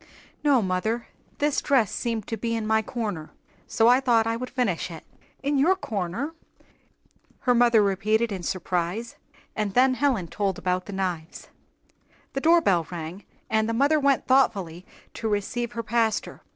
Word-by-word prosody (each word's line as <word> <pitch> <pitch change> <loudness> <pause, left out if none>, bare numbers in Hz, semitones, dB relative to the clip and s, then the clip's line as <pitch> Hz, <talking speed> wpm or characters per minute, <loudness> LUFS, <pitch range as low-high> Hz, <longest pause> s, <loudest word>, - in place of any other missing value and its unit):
"No, 275 -6 +4
mother; 205 +6 -1 0.3
this 290 -1 +1
dress 255 -8 +2
seemed 230 -4 -2
to 225 - -3
be 230 +1 -2
in 225 -1 -2
my 220 0 +2
'corner,' 210 -9 -4 0.4
so 225 - +3
I 250 +2 +6
thought 235 -4 +3
I 225 0 0
would 255 +2 -5
finish 215 -11 -1
it." 165 -2 -9 0.4
"In 285 0 +1
your 345 +7 +4
'corner'!" 225 - -3 1.1
her 250 - +3
mother 235 -3 +5
repeated 215 +3 +1
in 190 -2 -4
surprise, 180 +5 -2 0.4
and 210 -2 -2
then 255 +1 +5
Helen 255 -8 0
told 195 +2 -2
about 180 0 -1
the 200 - -6
knives. 180 -4 -4 0.8
The 275 - -2
doorbell 275 - +4
rang, 175 +2 -7 0.2
and 220 0 +1
the - - 0
mother 285 +6 +3
went 280 -2 +2
thoughtfully 195 -10 +1 0.3
to 225 - -4
receive 235 +3 -2
her 230 -1 -4
pastor. 225 -1 -1
225 Hz, 160 wpm, -25 LUFS, 190-250 Hz, 1.1 s, I